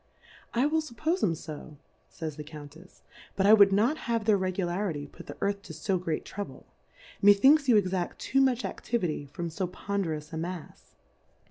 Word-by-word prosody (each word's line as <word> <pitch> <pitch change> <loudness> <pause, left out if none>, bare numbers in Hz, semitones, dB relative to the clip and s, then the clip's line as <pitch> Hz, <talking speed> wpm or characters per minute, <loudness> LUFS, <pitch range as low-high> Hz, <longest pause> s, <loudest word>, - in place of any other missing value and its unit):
I 245 +4 +3
will 315 +2 +2
fuppoie 315 +5 -2
'em 165 -4 +2
fo, 150 -1 -9 0.5
[ays 155 -2 -4
the 150 - -7
Countefs^ 150 +3 -13 0.3
but 195 - +1
I 210 - +8
would 200 -2 +7
not 225 +10 +3
have 230 -2 0
their 215 -2 +5
Regularity 185 -4 -1
put - - -13
the - - -8
Earth 200 0 0
to 160 -5 -10
fo 180 +4 -1
great 165 -3 -3
Trouble; 205 0 -7 0.6
methinks 265 +9 +6
you 230 - +7
exact 185 -3 -1
too 270 - +1
much 255 -2 +2
Aftivity 170 - -2
from 170 +3 -5
fo 180 +3 -2
ponderous 170 -5 -3
a - - -3
Mafs. 170 0 -7
190 Hz, 170 wpm, -28 LUFS, 160-220 Hz, 0.6 s, I